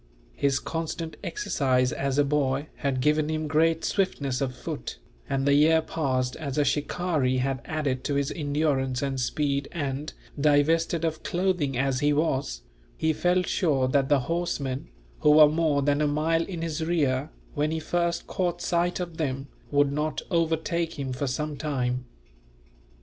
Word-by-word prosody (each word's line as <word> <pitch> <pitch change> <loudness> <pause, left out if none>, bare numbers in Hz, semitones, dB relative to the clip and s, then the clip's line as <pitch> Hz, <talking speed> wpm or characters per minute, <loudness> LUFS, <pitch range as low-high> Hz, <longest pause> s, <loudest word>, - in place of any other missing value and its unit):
His 135 - +1
constant 165 0 -4
exercise 130 - +1
as 135 0 -1
a 145 - +5
boy 140 0 0
had 135 -2 -1
given 150 +2 +2
him 155 0 -1
great 160 +2 +2
swiftness 140 -9 0
of 130 -2 -1
foot, - - -6 0.3
and 135 0 0
the 140 - +4
year 155 +3 +5
passed 130 -6 -1
as 140 -4 -4
a 145 - +3
shikaree 145 -1 0
had 130 0 -1
added 145 -5 -2
to 145 - 0
his 140 -1 0
endurance 145 -4 0
and 135 -1 -1
speed 140 +2 0
and, 145 -2 -3 0.3
divested 160 +3 +3
of 160 -1 -2
clothing 175 -7 0
as 135 0 +1
he 145 +1 +3
was, 135 - -1 0.3
he 160 - +1
felt 180 +3 +2
sure 140 -7 +2
that 135 0 +2
the 145 -2 +4
horsemen, 140 -4 -2 0.3
who - - +4
were 155 0 +9
more 155 -2 +1
than 145 +1 +2
a 150 - +3
mile 160 +3 +1
in 170 -4 -5
his 160 -1 -2
rear 150 -4 +1 0.2
when 150 +1 0
he 160 0 -1
first 170 +1 -1
caught 175 -2 -1
sight 175 +1 0
of 170 -3 -5
them, 135 -3 -2 0.2
would 145 -1 +3
not 150 +2 -2
overtake 165 0 0
him 135 -2 -3
for 135 +3 -2
some 150 +4 -2
time. 125 -4 -2
150 Hz, 165 wpm, -26 LUFS, 135-160 Hz, 0.3 s, were